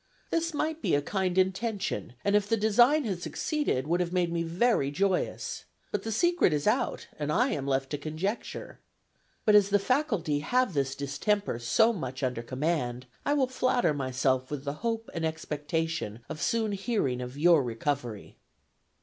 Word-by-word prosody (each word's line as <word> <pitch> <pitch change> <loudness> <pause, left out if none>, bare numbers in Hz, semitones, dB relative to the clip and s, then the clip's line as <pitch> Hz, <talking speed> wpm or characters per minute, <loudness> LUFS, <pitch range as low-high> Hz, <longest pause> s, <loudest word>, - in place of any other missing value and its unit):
This 330 0 +1
might 315 +1 -2
be - - +2
a 145 - +2
kind 190 +1 -1
intention, 190 - 0
and 200 0 +3
if 205 0 +2
the 225 - +3
design 240 +8 +4
had 190 -7 -3
succeeded, 295 - -1
would 170 +3 +1
have 175 -1 -1
made 180 -2 +1
me 170 - 0
very 170 - +2
joyous. 190 +5 -1 0.3
But - - -1
the 225 - -4
secret 345 - +3
is 145 -1 -1
out, 220 +5 +1
and 150 0 -1
I 245 - +3
am 140 - -2
left 135 -1 0
to 145 - -2
conjecture. 160 +9 -4 0.7
But 215 - +5
as 205 -1 +6
the 205 - +4
faculty 205 - 0
have 245 +7 +1
this 135 -2 0
distemper 140 - -1
so 220 - +3
much 135 - -5
under 125 -2 -1
command, 130 -1 -2 0.2
I 290 - +3
will 275 -3 +3
flatter 255 -7 +1
myself 130 -1 0
with 145 -2 -4
the 140 -1 -2
hope 230 -1 -2
and 165 - -3
expectation 160 -5 -2
of 155 - -6
soon 225 -2 +1
hearing 195 - -1
of 125 +2 -6
your 165 0 +5
recovery." 120 -2 -3
175 Hz, 175 wpm, -29 LUFS, 140-220 Hz, 0.7 s, as